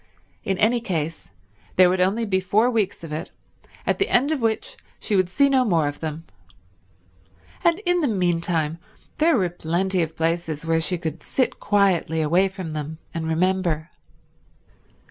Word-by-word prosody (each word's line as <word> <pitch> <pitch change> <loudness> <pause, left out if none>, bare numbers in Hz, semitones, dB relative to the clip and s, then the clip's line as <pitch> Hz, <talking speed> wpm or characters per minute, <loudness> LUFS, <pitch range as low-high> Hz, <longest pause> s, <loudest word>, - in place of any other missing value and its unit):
In 195 -1 -1
any 235 +5 +3
case 165 - -3 0.5
there 185 0 +7
would 180 +1 +1
only 205 +5 +1
be 190 -3 +1
four 210 +6 +2
weeks 215 -7 -1
of 165 - -7
it, 155 +4 -4 0.6
at - - 0
the 395 - +1
end 270 +5 +3
of 300 -5 -1
which 225 -1 -1 0.2
she 210 - -1
would 185 -2 +2
see 280 +10 +3
no 265 -2 +3
more 170 -10 +2
of 145 - -5
them. 160 0 -5 1.4
And 340 0 +4
in 355 -3 +1
the 295 - +2
meanwhile 170 -6 0 0.4
there 320 -1 +4
were 185 -4 +2
plenty 175 +2 0
of 160 -1 -3
places 165 -1 -1
where 165 0 +2
she 180 +2 -1
could 160 -2 -5
sit 255 - -1
quietly 195 -5 +2
away 170 +5 +3
from 185 -4 -7
them 155 +1 -5 0.2
and 165 -1 -3
remember. 170 -1 0
180 Hz, 165 wpm, -23 LUFS, 160-210 Hz, 1.4 s, there